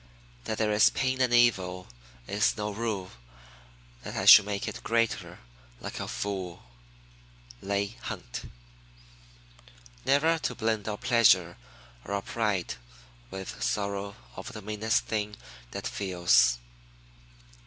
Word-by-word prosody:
That 110 - -3
there 110 -1 +1
is 105 0 +6
pain 130 0 -1
and 125 -1 +3
evil, 95 -7 +3 0.4
is 105 - +1
no 105 0 -2
rule 100 -3 -3 0.9
That - - -7
I - - -2
should 100 - +10
make 105 +3 -3
it 110 - -6
greater, 115 -1 0 0.4
like - - -6
a - - -4
fool. 95 -4 -4 1.0
Leigh 100 +2 -2
Hunt. - - -7 1.5
Never 160 +4 +3
to - - -2
blend 110 -3 -1
our 105 - -3
pleasure 95 -8 +4 0.5
or 100 - -3
our 100 - -2
pride 105 -6 -1 0.6
With 95 0 -7
sorrow 100 +11 -2 0.2
of - - -8
the 105 - -8
meanest 110 +1 0
thing 105 -1 -2 0.3
that - - -6
feels. 90 -10 +3
105 Hz, 120 wpm, -28 LUFS, 95-115 Hz, 1.5 s, should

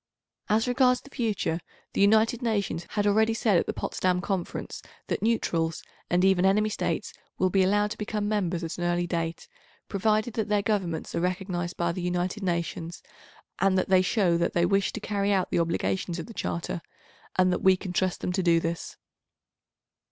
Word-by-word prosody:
As 220 +3 +2
regards 250 0 +3
the 280 - -16
future, 210 - -1 0.3
the - - 0
United 220 +4 +4
Nations 200 -7 -1
had 205 -1 -1
already 220 +2 +3
said 215 -4 +3
at - - -2
the - - 0
Potsdam 180 -1 0
Conference 190 -2 -4 0.2
that - - -2
neutrals 165 -8 0 0.3
and 180 +1 +3
even 190 -2 +4
enemy 210 +3 +3
States 215 - -2 0.2
will 185 0 +2
be 195 - +3
allowed 205 +2 +2
to 225 - -6
become 210 -1 -2
members 185 -5 -1
at 165 +2 -5
an - - -2
early 175 0 +1
date, 165 -1 -3 0.4
provided 215 +3 +1
that 220 -2 -2
their 205 -1 +2
Governments 190 -6 -1
are - - 0
recognised 180 -1 -2
by 170 0 +1
the 180 - -4
United 180 +3 -1
Nations, 170 -2 -3 0.6
and 190 -1 +3
that 185 - 0
they 185 -1 +6
show 185 -3 +2
that 170 - 0
they 170 0 +3
wish 195 +1 +2
to - - -4
carry 205 -1 -1
out 190 -2 +1
the - - +2
obligations 170 +1 -1
of 165 - -5
the 230 - -11
Charter, 170 -4 -3 0.5
and 185 0 +3
that - - -2
we 190 -1 +5
can 185 -1 -6
trust 185 0 0
them - - -1
to 190 +1 0
do 170 -2 +4
this. 165 0 -4
190 Hz, 190 wpm, -27 LUFS, 175-210 Hz, 0.6 s, they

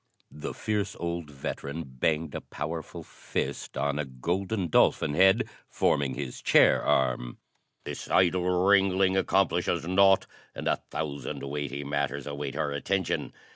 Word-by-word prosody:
The 75 - -6
fierce 105 -2 -2
old 85 -2 -3
veteran 70 +2 -5
banged 75 +4 -1
a - - -4
powerful 80 +2 -6
fist - - -4
on 70 +1 0
a 75 - -1
golden 90 - -2
dolphin 75 - +3
head 95 +6 +4 0.2
forming 70 -2 +1
his 70 -4 -6
chair - - +5
arm. 60 -2 +1 0.5
"This - - -6
idle 90 0 +3 0.2
wrangling 95 -1 +4
accomplishes 90 -3 +1
naught, 95 +1 +5 0.3
and - - -4
a - - +1
thousand 70 -3 -4
weighty 70 0 -4
matters 70 -1 -2
await 70 -1 -5
our 75 -1 -1
attention. 95 +6 -1
80 Hz, 135 wpm, -28 LUFS, 70-95 Hz, 0.5 s, chair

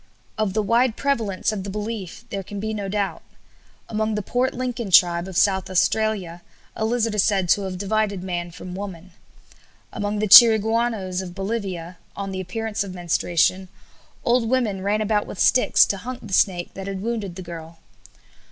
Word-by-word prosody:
Of 215 -3 -1
the 215 - +1
wide 230 +2 +2
prevalence 230 -9 0
of 205 -3 -4
the 200 - -6
belief 210 0 -5
there 200 - -3
can 200 +2 -8
be 220 +2 -3
no 200 -2 -4
doubt. 200 -1 -2 0.7
Among 220 0 -1
the 210 - -2
Port 250 +5 0
Lincoln 245 -4 -3
tribe 175 -1 +5
of 190 -2 -5
South 190 -2 +2
Australia 190 -2 0 0.3
a 220 - -1
lizard 230 -1 0
is 210 -3 +2
said 195 -3 +1
to 205 - +4
have 185 -1 -5
divided 200 -1 -1
man 175 -2 -3
from 180 +1 -9
woman. 185 -2 -7 0.8
Among 205 +1 -2
the 215 +1 0
Chiriguanos 220 -3 +6
of 180 -2 -8
Bolivia, 195 -4 -4 0.2
on 195 -1 -5
the 190 0 -4
appearance 220 +3 -3
of 190 -2 -8
menstruation, 175 +1 +1 0.6
old 240 -2 +2
women 230 -7 0
ran 205 +2 0
about 210 -1 0
with - - -8
sticks 250 - +4
to 200 - -2
hunt 250 +4 -7
the - - -7
snake 180 -3 +1
that 195 0 -7
had 195 -1 -5
wounded 215 -6 -3
the 185 - -7
girl. 165 -1 -9
200 Hz, 180 wpm, -23 LUFS, 185-220 Hz, 0.8 s, Chiriguanos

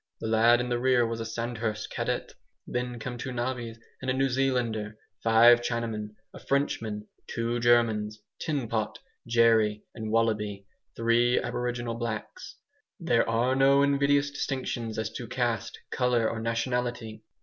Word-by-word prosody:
The - - -6
lad 115 +2 +5
in 120 0 -2
the 120 -1 0
rear 125 -1 +3
was 115 0 -3
a 115 - -3
Sandhurst 115 -2 -3
cadet. - - -2 0.3
Then 125 0 -3
came 120 +1 -6
two 130 - -4
navvies 120 -2 -3 0.2
and 130 - -3
a 130 - +1
New 135 +1 +2
Zealander, 120 -5 -1 0.2
five 115 +1 +6
Chinamen, 115 -3 -3 0.2
a - - -10
Frenchman, 110 -7 -1 0.2
two 115 +1 -2
Germans, 110 -3 +2 0.2
Tin 145 -7 -2
Pot, 110 -1 -2 0.3
Jerry, 115 -3 +3
and 110 -1 -5
Wallaby 105 -3 0 0.3
three 120 +2 +3
aboriginal 120 -1 -3
blacks. 115 -2 -5 0.4
There 120 -10 +2
are 120 +3 +2
no 135 +1 +5
invidious 140 0 +2
distinctions 130 -5 -3
as 110 0 -2
to 115 +1 -6
caste, 120 -3 -2
colour, 125 -3 +2
or 115 - -3
nationality. 115 -1 -2
115 Hz, 145 wpm, -28 LUFS, 110-125 Hz, 0.4 s, five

